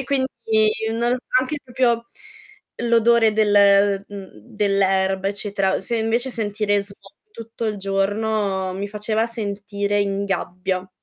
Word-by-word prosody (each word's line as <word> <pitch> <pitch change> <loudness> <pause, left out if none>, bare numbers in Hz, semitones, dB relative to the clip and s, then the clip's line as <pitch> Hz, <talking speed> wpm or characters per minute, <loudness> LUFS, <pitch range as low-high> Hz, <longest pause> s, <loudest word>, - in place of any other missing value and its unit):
e 270 - -4
quindi 235 -6 +1 0.2
non 235 +1 0
so 255 - -13 0.2
anche 295 +3 -3
proprio 235 -2 0 0.7
l'odore 235 -1 +3
del 200 -2 +4
mhmm, 200 -2 -9 0.2
dell'erba, 195 -1 +1
eccetera. 200 -2 -1
Se 230 +4 -2
invece 230 +4 0
sentire 205 -2 0
smo 200 0 -8 0.3
tutto 230 - -8
il 210 -1 -2
giorno 195 0 -1
mi 200 +1 -4
faceva 215 +2 -1
sentire 205 -2 -2
in 200 0 -1
gabbia. 185 -1 -3
205 Hz, 125 wpm, -21 LUFS, 195-230 Hz, 0.7 s, del